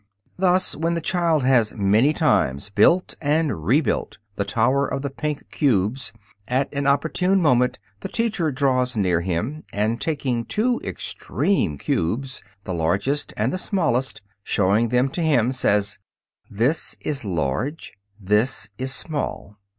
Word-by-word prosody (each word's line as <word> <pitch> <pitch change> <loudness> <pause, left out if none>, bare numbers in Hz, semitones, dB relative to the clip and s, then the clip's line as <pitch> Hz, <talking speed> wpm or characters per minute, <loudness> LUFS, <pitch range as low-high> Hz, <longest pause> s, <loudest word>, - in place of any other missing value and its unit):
Thus, 185 0 +3
when 165 +2 -1
the - - 0
child 170 -5 +1
has 125 -4 +3
many 110 +7 +3
times 70 - +1
built 175 - +3
and 150 - 0
rebuilt 130 - +1 0.2
the 100 - 0
tower 130 +7 +1
of 135 - -3
the 140 - -3
pink 150 +1 -4
cubes, 125 - +1 0.4
at 130 +3 0
an 140 -1 -1
opportune 180 +7 +2
moment 125 -7 +3 0.2
the - - -5
teacher 215 -9 0
draws 130 -3 +1
near 90 -4 +2
him, 100 - -3
and 110 +3 -1
taking 135 -6 -1
the - - -11
two 240 +3 0
extreme 185 - -1
cubes, 130 - -2 0.2
the 95 - -4
largest 100 - 0
and 110 +5 0
the 185 - -2
smallest, 150 - -1
and - - -41 0.2
showing 105 +5 +2
them 125 +2 +2
to 170 - -4
him, 130 -7 +3
says, 105 -7 +1 0.5
"This 120 +10 0
is 140 -3 -3
large"; 95 - -2 0.3
"This 105 +2 0
is 130 +1 -1
small." 135 -9 -3
130 Hz, 145 wpm, -23 LUFS, 105-155 Hz, 0.5 s, Thus